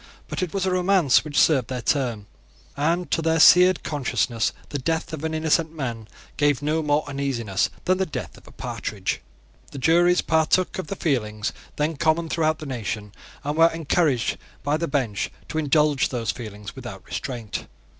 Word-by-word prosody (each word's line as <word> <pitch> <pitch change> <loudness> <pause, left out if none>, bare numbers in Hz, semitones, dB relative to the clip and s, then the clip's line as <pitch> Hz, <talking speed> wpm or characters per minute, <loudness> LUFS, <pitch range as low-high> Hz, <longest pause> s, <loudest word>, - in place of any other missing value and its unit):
But - - -4
it 180 -3 -2
was 195 -1 -1
a 190 - +1
romance 180 -6 +4
which 150 -1 0
served 135 -8 +4
their 125 -1 -4
turn; 120 -6 0 0.5
and 165 +5 0
to - - +2
their 165 0 +2
seared 180 +3 +7
consciences 130 -5 0 0.2
the 145 - -3
death 160 +4 -2
of 155 -1 -5
an 160 0 -1
innocent 160 +1 +1
man 120 -7 -4 0.3
gave 145 -1 +2
no 155 +2 +1
more 150 0 +1
uneasiness 130 -8 -1 0.2
than 185 +1 +2
the 190 - +2
death - - -6
of - - -18
a - - -13
partridge. - - -4 0.5
The - - -9
juries 175 +6 +4
partook 160 +4 +2
of 185 - -4
the 195 - -4
feelings 110 - -1 0.2
then 150 +1 -1
common 160 +2 +1
throughout 155 -1 +1
the 155 - -8
nation, 110 -5 -4 0.3
and 145 +1 -2
were 165 +1 +6
encouraged 155 -5 +1 0.2
by 145 +1 +1
the 170 +1 -2
bench 125 -8 -1 0.2
to 160 - -1
indulge 150 -2 +2
those 115 -4 -1
feelings 105 -1 -8
without 105 -8 -8
restraint. 120 -6 -5
150 Hz, 175 wpm, -24 LUFS, 125-165 Hz, 0.5 s, seared